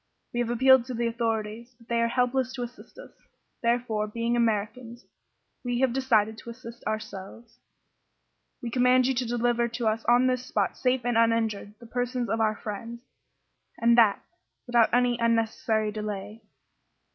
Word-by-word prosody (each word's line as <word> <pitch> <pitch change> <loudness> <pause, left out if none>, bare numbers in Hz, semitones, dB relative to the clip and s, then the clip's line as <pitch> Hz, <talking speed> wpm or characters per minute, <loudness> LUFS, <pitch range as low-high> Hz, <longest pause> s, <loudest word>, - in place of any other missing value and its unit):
We 240 - -2
have 240 -1 0
appealed 260 +1 +5
to 255 -1 -5
the 235 +1 -1
authorities, 230 0 -3
but 230 -1 -21
they 235 0 +1
are 230 - +3
helpless 250 +1 0
to 250 -2 -4
assist 245 - -11
us. - - -11 0.5
Therefore, 235 -3 0
being 230 +2 -1
Americans, 235 +1 -2 0.6
we 245 -1 -1
have 260 -3 +2
decided 225 -4 +1
to 235 - -10
assist 235 0 -10
ourselves. 215 +2 -6 1.0
We 235 - -4
command 250 +1 +4
you 265 - +2
to 250 -1 -2
deliver 240 0 +1
to 235 0 -3
us 220 +1 0
on 245 +1 +4
this 255 -1 +1
spot, 205 -6 -1
safe 255 -1 0
and 240 -2 +2
uninjured, 225 -3 0
the 235 - -13
persons 245 0 -2
of 225 - 0
our 215 -1 +2
friends, 230 +3 -7 0.8
and 235 0 +4
that 225 -4 +4 0.4
without 240 -2 +3
any 245 -1 +2
unnecessary 225 -2 +1
delay." 210 0 -6
235 Hz, 160 wpm, -27 LUFS, 220-245 Hz, 1.0 s, appealed